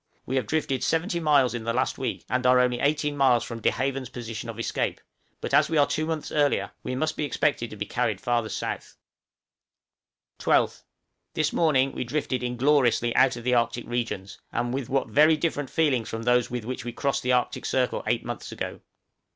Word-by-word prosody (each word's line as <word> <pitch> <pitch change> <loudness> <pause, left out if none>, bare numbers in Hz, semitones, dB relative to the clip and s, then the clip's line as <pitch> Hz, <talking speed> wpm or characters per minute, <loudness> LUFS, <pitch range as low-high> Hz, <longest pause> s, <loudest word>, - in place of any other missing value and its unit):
We 130 - -3
have 130 - -1
drifted 140 -4 -1
70 170 +2 0
miles 145 -6 +3
in 120 -2 -4
the 115 +1 -1
last 130 +2 0
week, 130 - -3
and 125 0 0
are 125 0 +6
only 125 -1 +2
18 145 0 +1
miles 130 -5 +4
from 115 -1 -7
De - - +4
Haven's 135 0 -2
position 115 -2 -6
of 115 - -6
escape; 115 - -2 0.4
but - - -4
as - - +5
we 160 - +1
are 145 - +6
two 155 +2 -2
months 160 -2 -3
earlier, 145 -1 +1
we 130 - -4
must 155 +4 -2
expect 145 -5 +1
to - - -5
be - - -3
carried - - -1
farther 120 -2 0
south. - - -4 1.4
12th. - - +2 0.5
This 155 -1 +1
morning 135 -5 +3
we - - -3
drifted 130 0 -2
ingloriously 125 -1 +2
out 130 -1 +4
of 120 - -8
the 125 +1 +1
Arctic 120 0 +1
regions, 115 -5 -3
and 120 +1 -1
with 135 -2 -3
what 135 0 +1
very 155 +2 +5
different 145 -4 -1
feelings 140 -8 +1
from 115 0 -4
those 125 0 +3
with 120 -3 -4
which 130 +2 -4
we 120 - -4
crossed 140 +3 -1
the 125 0 +1
Arctic 125 -1 0
circle 125 -1 0
eight - - 0
months - - -6
ago! - - -5
130 Hz, 200 wpm, -26 LUFS, 120-145 Hz, 1.4 s, are